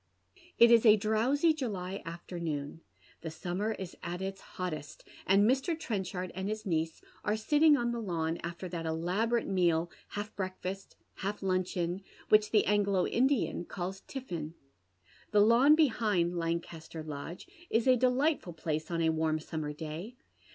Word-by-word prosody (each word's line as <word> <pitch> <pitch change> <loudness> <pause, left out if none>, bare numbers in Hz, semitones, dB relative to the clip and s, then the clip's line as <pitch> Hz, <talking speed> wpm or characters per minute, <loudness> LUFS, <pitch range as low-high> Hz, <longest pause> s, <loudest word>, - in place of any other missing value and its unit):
It 235 0 +8
is 230 -1 +7
a 215 -3 +8
drowsy 235 +10 +2
July 200 -9 -4
afternoon. 165 -3 -5 0.4
The 160 - -4
summer 180 +7 -2
ia 190 -2 -5
at 175 0 -4
its 195 0 -4 0.2
hottest, 155 -6 -5 0.2
and 195 +2 +5
Mr. 275 +7 +1
Trenchard 190 - -3
and 190 +2 -3
his 215 +1 -4
niece 160 -3 -1 0.2
are 210 - +1
sitting 295 +6 +5
on 240 -2 0
the 235 -1 -3
lawn 165 -5 -2
after 170 +2 -5
that 165 -2 -4
elaborate 185 +9 0
meal, 175 -3 +1 0.2
half 210 +1 -5
breakfast, 190 0 -5 0.2
half 200 +1 -4
luncheon, 185 -1 -1 0.3
which 215 0 +5
tire 215 - +5
Anglo 200 -2 +2
Indian 260 -7 +1
calls 190 +2 -5
tiffin. 170 - -5 0.7
The 210 -1 +4
lawn 240 +8 +6
behind 215 - +2
Lancaster 165 -1 -4
Lodge 155 +3 -7 0.2
is 225 0 +2
a 255 -1 +6
delightful 255 - +1
place 155 -1 -3
on 165 -1 0
a 160 - +3
warm 160 0 0
summer 155 -1 -4
day. 160 +9 -6
190 Hz, 150 wpm, -31 LUFS, 170-220 Hz, 0.7 s, It